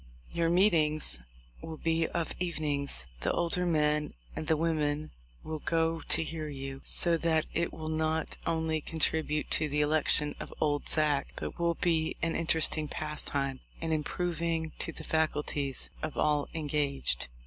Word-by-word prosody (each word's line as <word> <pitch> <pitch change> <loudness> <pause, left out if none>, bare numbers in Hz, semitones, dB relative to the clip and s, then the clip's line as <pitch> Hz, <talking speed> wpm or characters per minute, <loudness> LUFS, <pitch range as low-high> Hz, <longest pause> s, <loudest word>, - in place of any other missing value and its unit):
Your 170 -1 +1
meetings 160 - +3 0.4
will 160 -1 -7
be 165 0 +1
of 170 -2 -2
evenings; 150 - 0
the - - 0
older 175 +1 0
men 150 -2 +1 0.2
and 155 - -4
the 160 - +3
women 155 -2 0 0.3
will 155 -1 -4
go 165 +1 0
to - - +3
hear 160 -1 -4
you, 135 -1 -6
so 170 -1 +5
that 160 -1 +1
it 170 0 0
will 155 - -7
not 160 0 -1
only 160 -1 0
contribute 155 -1 0
to 155 -1 +4
the 150 +1 +1
election 150 0 +4
of - - -7
'Old 145 -2 0
Zack,' 150 -3 +2
but - - -6
will 170 0 +1
be 160 -2 +1
an 165 0 +1
interesting 160 -2 +1
pastime 140 -3 -2 0.2
and 165 -1 -1
improving 165 0 -1
to - - +2
the - - -9
faculties 150 -3 -1
of 155 - -4
all 150 -1 +2
engaged." 145 - 0
155 Hz, 150 wpm, -30 LUFS, 150-165 Hz, 0.4 s, so